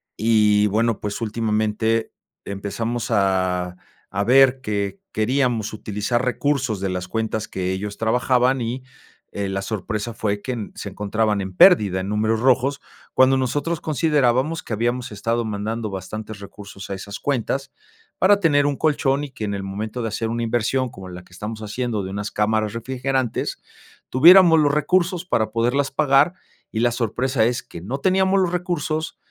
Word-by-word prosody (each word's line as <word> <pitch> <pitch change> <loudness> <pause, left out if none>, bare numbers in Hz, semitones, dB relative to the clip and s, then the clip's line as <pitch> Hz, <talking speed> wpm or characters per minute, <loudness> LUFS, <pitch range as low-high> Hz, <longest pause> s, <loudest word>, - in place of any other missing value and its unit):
Y, 105 -1 +3
bueno, 110 +2 0
pues, 105 -1 -4
últimamente 110 0 0 0.3
empezamos 105 +4 -3
a 95 -3 +1 0.4
a 100 +1 0
ver 135 +1 +5
que 100 -4 -3
queríamos 120 -1 0
utilizar 110 +3 -2
recursos 125 -4 0
de 95 - -1
las 90 0 -3
cuentas 110 0 -2
que 95 0 -3
ellos 100 +2 -4
trabajaban, 125 +3 +2
y, 120 +2 -3 0.5
eh, 100 -1 -3
la 95 0 -2
sorpresa 110 +2 -4
fue 100 -1 -2
que 120 -4 -5
se 100 - -6
encontraban 105 +1 -1
en 95 -1 -5
pérdida, 100 - +6
en 95 - -5
números 110 +1 0
rojos, 135 +2 +2 0.3
cuando 130 +1 +5
nosotros 145 +6 -1
considerábamos 150 0 +1
que 115 - -5
habíamos 120 +1 -1
estado 115 +2 -1
mandando 110 +2 -3
bastantes 105 +3 -7
recursos 100 0 -10
a - - -3
esas 100 +2 -7
cuentas 135 0 -2 0.5
para 200 +1 +4
tener 145 -4 +3
un 145 - +1
colchón 145 -2 +1
y, 145 - -5
que 110 - -5
en 100 - -3
el 100 -1 -4
momento 105 +5 -4
de 115 - -2
hacer 110 +2 -2
una 115 +1 -2
inversión 120 +3 0
como 95 -3 -11
la 90 0 -9
que 90 - -25
estamos 110 +3 -6
haciendo 110 0 -3
de 95 - -5
unas 105 +1 -4
cámaras 110 0 0
refrigerantes, 130 +1 -2 0.5
tuviéramos 170 +4 +7
los 145 -1 +3
recursos 175 +3 +1
para 110 - 0
poderlas 125 +5 +1
pagar, 140 +5 +3 0.4
y 110 - -2
la 120 0 +3
sorpresa 120 +1 0
es 120 +2 -1
que 105 - -10
no 125 +10 -4
teníamos 190 +3 +3
los 180 -2 +1
recursos, 170 -3 -2
115 Hz, 165 wpm, -22 LUFS, 105-135 Hz, 0.5 s, tuviéramos